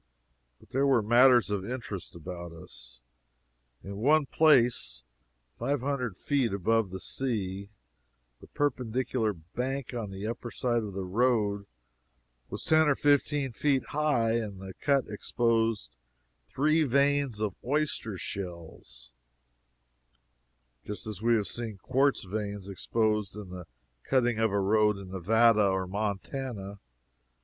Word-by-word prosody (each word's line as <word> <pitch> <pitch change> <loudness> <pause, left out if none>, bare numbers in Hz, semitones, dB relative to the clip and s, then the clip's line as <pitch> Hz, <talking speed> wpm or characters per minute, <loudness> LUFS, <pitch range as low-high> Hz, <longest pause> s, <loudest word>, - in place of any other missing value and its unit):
But - - -21
there 135 +2 +2
were 130 -5 +4
matters 120 0 +5
of 100 -2 -1
interest 105 -6 -6
about 85 +1 -7
us. - - -12 0.8
In 100 +1 -7
one 145 +7 +4
place, 125 - +3 0.6
five 135 +2 0
hundred 125 -7 -2
feet 135 -7 0
above 110 +2 +1
the 95 +1 -6
sea, 100 -6 -3 0.7
the - - -14
perpendicular 125 -4 -1
bank 125 +11 -4
on 115 -4 -4
the 95 +1 -6
upper 120 +1 -4
side 120 0 0
of 105 -3 -6
the 95 0 -3
road 105 -1 +1 0.8
was - - -6
ten 155 0 +4
or 145 - +4
fifteen 145 -1 +2
feet 135 +2 0
high, 145 -7 +1
and 105 -4 -4
the 95 0 -8
cut 140 +3 +1
exposed 115 - 0 0.5
three 155 +3 +2
veins 140 -3 +2
of 105 -3 -1
oyster 135 -6 -1
shells, 85 -11 -8 1.7
just 105 - -6
as 105 -3 -6
we 115 +1 +3
have 105 -3 0
seen 115 0 -5
quartz 135 +7 +1
veins 100 0 -4
exposed 105 +1 -1
in 105 -3 -8
the 90 -1 -8 0.3
cutting 120 - +1
of 110 -2 +2
a 100 - +1
road 105 +1 +3
in 95 -2 -9
Nevada 110 +3 +4
or 95 -1 0
Montana. 100 +1 -4
110 Hz, 130 wpm, -29 LUFS, 100-130 Hz, 1.7 s, matters